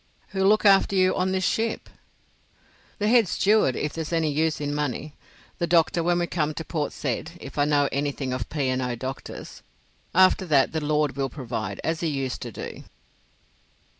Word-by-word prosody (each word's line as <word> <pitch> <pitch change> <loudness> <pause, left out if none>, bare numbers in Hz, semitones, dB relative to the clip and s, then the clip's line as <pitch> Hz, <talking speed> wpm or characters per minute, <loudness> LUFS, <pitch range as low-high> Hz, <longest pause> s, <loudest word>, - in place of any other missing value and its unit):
"Who'll 190 -1 +1
look 215 +1 +4
after 195 0 +5
you 185 0 +3
on 185 +1 0
this 190 0 0
ship?" 225 +5 -1 1.1
"The 210 - 0
head 230 -2 +5
steward, 200 - +3
if 150 - -2
there's 160 -1 -5
any 165 -2 +1
use 155 +2 0
in 145 -1 -2
money. 150 0 -3 0.5
The 170 - 0
doctor 170 0 +3
when 175 +1 +2
we 175 - +1
come 155 -3 -1
to 160 - -5
Port 150 -1 -2
Said, 145 +4 -3
if 140 - -10
I 145 - +4
know 145 -1 +3
anything 140 -2 -2
of 130 - -4
P. 145 -3 -1
and 130 0 0
O. 125 -1 -2
doctors. 130 +3 -7 0.5
After 185 0 +5
that, 140 -4 +3
the 160 - -2
Lord 150 -1 +1
will 135 -1 -1
provide, 115 -7 -5
as 160 0 -1
He 170 - -1
used 135 -4 -3
to 120 - -5
do." - - -8
155 Hz, 190 wpm, -25 LUFS, 140-175 Hz, 1.1 s, after